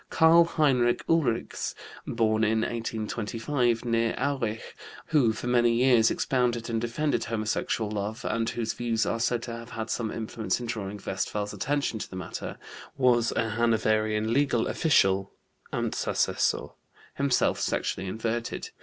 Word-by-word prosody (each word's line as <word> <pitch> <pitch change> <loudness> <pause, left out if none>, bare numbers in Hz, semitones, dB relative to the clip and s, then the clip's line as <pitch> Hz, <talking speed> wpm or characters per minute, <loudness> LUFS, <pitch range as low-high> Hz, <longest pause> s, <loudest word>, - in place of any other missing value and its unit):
Karl 165 +1 +6
Heinrich 130 -7 +2
Ulrichs 145 -9 0 0.3
(born 110 -1 +1
in 110 +1 +2
1825 115 +2 -1
near 115 -1 +1
Aurich), 130 -6 -2 0.3
who 140 -8 +4
for 110 - -6
many 120 -1 +3
years 120 -2 +5
expounded 120 -2 0
and 115 -1 0
defended 140 +6 -1
homosexual 110 -1 -1
love, 105 +2 -4
and 115 0 0
whose 115 -1 -2
views 115 -2 0
are 115 - -1
said 120 0 0
to 120 - -5
have 115 +1 -9
had 110 -2 -5
some 115 -2 -1
influence 110 -2 -2
in 120 - -5
drawing 105 -3 -4
Westphal's 105 +2 -2
attention 140 -5 -1
to - - -6
the - - -9
matter, 95 - -6 0.4
was 120 -3 +3
a 115 0 0
Hanoverian 110 -1 +1
legal 135 -4 +2
official 95 - +2 0.4
(Amtsassessor), - - 0 0.4
himself 140 -2 +2
sexually 95 - -1
inverted. 115 +3 -3
115 Hz, 135 wpm, -27 LUFS, 110-125 Hz, 0.4 s, Karl